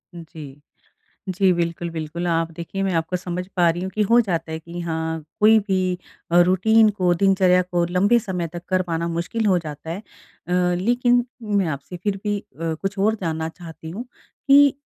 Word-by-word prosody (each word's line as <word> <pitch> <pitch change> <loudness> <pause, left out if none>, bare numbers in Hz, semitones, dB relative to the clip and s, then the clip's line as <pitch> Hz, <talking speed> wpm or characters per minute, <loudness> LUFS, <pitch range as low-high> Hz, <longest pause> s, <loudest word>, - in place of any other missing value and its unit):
जी। 155 -4 -10 0.7
जी 190 0 +3
बिल्कुल, 170 0 -2
बिल्कुल। 165 +2 -4
आप 165 -1 0
देखिए 170 +4 -5
मैं 190 -2 0
आपको 165 +2 -1
समझ 180 0 -4
पा 175 -2 +4
रही 175 +2 -1
हूँ 190 - -3
कि 215 - +1
हो 230 +4 +5
जाता 165 -6 -3
है 160 - -4
कि 170 +2 -8
हाँ, 160 -1 -3 0.2
कोई 220 +1 +7
भी 185 -1 +1 0.4
अ, 175 - +6
रूटीन 215 +5 +4
को, 185 -4 +1
दिनचर्या 185 0 +4
को 175 -1 0
लंबे 200 +7 +3
समय 180 -5 -3
तक 175 0 -7
कर 185 -1 +2
पाना 170 -1 -2
मुश्किल 170 +7 -2
हो 190 -3 +4
जाता 155 -1 -8
है। 170 +4 -3
अ, - - -15 0.8
लेकिन 245 +2 +3 0.2
मैं 200 -4 +1
आपसे 155 +4 -5
फिर 195 +2 -2
भी 205 -1 0
अ, 165 0 -5
कुछ 195 +1 -3
और 215 +2 +3
जानना 160 -2 -2
चाहती 165 -1 -10
हूँ, 205 +9 -5 0.4
कि 280 0 +7
180 Hz, 190 wpm, -22 LUFS, 165-195 Hz, 0.8 s, कोई